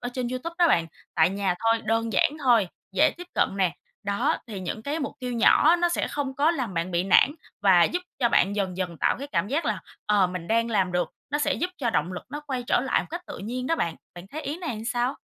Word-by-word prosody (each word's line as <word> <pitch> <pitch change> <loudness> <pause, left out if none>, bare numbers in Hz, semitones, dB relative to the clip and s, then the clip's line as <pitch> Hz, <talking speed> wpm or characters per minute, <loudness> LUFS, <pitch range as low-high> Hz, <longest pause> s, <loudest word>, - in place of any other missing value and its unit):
ở 245 - -3
trên 250 -2 -2
YouTube 255 +7 -4
đó 345 - +5
bạn, 170 - +3 0.3
tại 160 +3 +4
nhà 195 -2 0
thôi, 225 0 +2
đơn 225 0 0
giản 190 - +3
thôi, 230 -7 +4 0.2
dễ 190 - +4
tiếp 355 0 -9
cận - - +3
nè. 185 -3 +1 0.3
Đó, 210 +10 +1
thì 205 -4 -6
những 185 +4 -4
cái 290 +6 -2
mục 280 - -3
tiêu 250 -1 -3
nhỏ 305 +8 +5
nó 345 0 +2
sẽ 345 - -1
không 275 -2 -3
có 295 +4 +3
làm 250 - -3
bạn 170 +2 -1
bị 175 +1 0
nản 270 +9 +5 0.3
và 180 -4 +6
giúp 355 - 0 0.2
cho 240 - +4
bạn 200 0 +2
dần 190 -3 -1
dần 180 -3 -3
tạo - - +2
cái 280 - -5
cảm 200 -7 -1
giác 310 +5 0
là, - - 0 0.3
ờ, 205 -3 +4
mình 180 -2 -6
đang 230 +1 +2
làm 190 -4 +1
được, 180 0 0 0.2
nó 290 - 0
sẽ - - +1
giúp 360 +3 -2
cho 240 -5 0
động 175 -1 0
lực 180 - -6
nó 295 +1 -5
quay 260 -3 -2
trở - - +3
lại 260 - +1
một - - -11
cách 345 +2 -5
tự - - -7
nhiên 250 +5 -4
đó 330 - +1
bạn. 165 - -1 0.2
Bạn 175 +1 -10
thấy 310 +2 -5
ý 300 +5 -4
này 340 -6 -4
làm 215 +1 -7
sao? 245 +2 0
230 Hz, 265 wpm, -26 LUFS, 190-280 Hz, 0.3 s, và